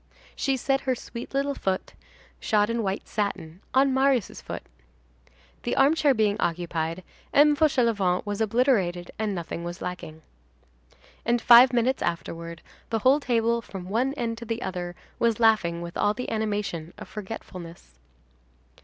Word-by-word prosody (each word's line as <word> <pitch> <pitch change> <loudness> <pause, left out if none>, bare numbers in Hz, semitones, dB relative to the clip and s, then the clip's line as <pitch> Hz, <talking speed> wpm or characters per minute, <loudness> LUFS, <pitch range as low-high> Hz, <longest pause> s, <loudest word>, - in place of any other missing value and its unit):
She 270 -1 0
set 270 +2 0
her 260 -1 0
sweet 235 0 -8
little 280 +1 0
foot, 190 -7 -2 0.5
shod 210 0 +2
in 230 0 -1
white 195 -2 -3
satin, 195 -5 -3
on 265 +1 +4
Marius' 265 -4 +1
foot. - - -6 1.0
The 240 - -2
armchair 290 -1 +4
being 210 -2 +2
occupied, 170 0 -2 0.3
M. 295 +1 +6
Fauchelevent 230 - +2
was 205 +1 -3
obliterated; 210 -7 +1
and 215 -2 -1
nothing 170 -1 -5
was 175 +1 -6
lacking. 165 -3 -7 1.0
And, 240 +1 +2
five 240 +2 +8
minutes 245 +2 +1
afterward, 170 -1 -4 0.3
the 225 - 0
whole 260 +6 +4
table 235 -3 +1
from 190 -5 -8
one 255 +7 0
end 230 -4 -3
to 235 - -8
the 230 +1 -3
other, 175 -1 -4 0.2
was 230 -2 +2
laughing 180 -7 +3
with 170 0 -8
all 205 0 +1
the 250 - -5
animation 205 -7 -2
of 215 - -9
forgetfulness. 180 - -9
220 Hz, 145 wpm, -26 LUFS, 180-245 Hz, 1.0 s, five